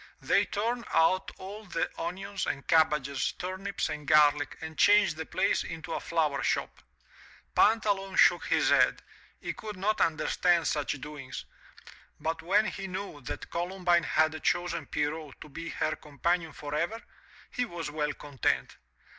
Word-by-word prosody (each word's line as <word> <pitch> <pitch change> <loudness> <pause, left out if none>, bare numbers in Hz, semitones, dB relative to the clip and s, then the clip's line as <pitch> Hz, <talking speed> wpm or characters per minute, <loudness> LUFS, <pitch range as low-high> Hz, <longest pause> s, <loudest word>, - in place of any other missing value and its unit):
They - - +3
turned 235 +3 -2
out 185 +4 +3
all 200 +3 -8
the 175 -3 -1
onions 195 +3 -3
and 140 - -3
cabbages, 150 -4 +2
turnips 190 +2 -3
and 150 -2 -6
garlic, 150 -1 +4
and 160 0 -7
changed 205 0 +5
the 160 0 -6
place 195 +2 +1
into 165 0 -6
a - - -1
flower 155 -5 0
shop. - - -1 0.7
Pantaloon 205 -3 +2
shook - - +5
his - - +3
head - - +4 0.2
— - - -29
^he - - -3
could 210 -3 -7
not 210 +3 0
understand 170 +1 +2
such 145 -1 -1
doings 145 -2 -7 0.4
— - - -20
^but 165 +1 -2
when 200 +6 +3
he 195 -1 -4
knew 185 -5 -6
that - - -7
Columbine 175 0 +1
had 155 +1 +2
chosen 175 -1 0
Pierrot 150 -1 -3
to - - -11
be 165 +4 -6
her 155 - -1
companion 160 +3 -1
forever, 155 +9 -3 0.5
he 250 - -1
was 170 -8 -5
well 150 -1 -1
content. 145 -5 -1
165 Hz, 155 wpm, -29 LUFS, 150-190 Hz, 0.7 s, changed